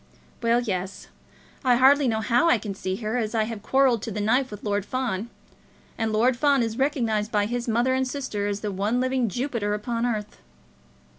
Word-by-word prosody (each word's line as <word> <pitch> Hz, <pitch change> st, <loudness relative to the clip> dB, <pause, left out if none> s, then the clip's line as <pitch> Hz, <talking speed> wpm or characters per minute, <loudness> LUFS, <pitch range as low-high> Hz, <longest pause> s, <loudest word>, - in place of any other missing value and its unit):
"Well, 235 Hz, +1 st, +2 dB
yes; 190 Hz, -3 st, -4 dB, 0.5 s
I 250 Hz, -2 st, +4 dB
hardly 270 Hz, +3 st, +5 dB
know 220 Hz, -2 st, 0 dB
how 245 Hz, +8 st, +3 dB
I 245 Hz, -, +5 dB
can 205 Hz, -1 st, -5 dB
see 190 Hz, -1 st, -3 dB
her, 215 Hz, +3 st, -3 dB
as 220 Hz, -2 st, -2 dB
I 220 Hz, -, +3 dB
have 220 Hz, -1 st, -5 dB
quarrelled 260 Hz, -1 st, +2 dB
to -, -, -5 dB
the 210 Hz, -, -4 dB
knife 250 Hz, +6 st, +2 dB
with 210 Hz, -1 st, -9 dB
Lord 205 Hz, -1 st, 0 dB
Fawn; 235 Hz, -3 st, -3 dB, 0.7 s
and 225 Hz, -1 st, -1 dB
Lord 235 Hz, +4 st, +3 dB
Fawn 280 Hz, 0 st, +3 dB
is 225 Hz, +1 st, -3 dB
recognised 230 Hz, -7 st, 0 dB
by 205 Hz, -1 st, +2 dB
his 240 Hz, +2 st, -3 dB
mother 240 Hz, +3 st, +2 dB
and 260 Hz, 0 st, 0 dB
sisters 210 Hz, -7 st, -3 dB
as -, -, -12 dB
the 210 Hz, -, -3 dB
one 205 Hz, +5 st, 0 dB
living 255 Hz, -2 st, 0 dB
Jupiter 230 Hz, -2 st, -2 dB
upon 230 Hz, +2 st, -2 dB
earth." 215 Hz, -3 st, -4 dB
230 Hz, 200 wpm, -25 LUFS, 210-255 Hz, 0.7 s, hardly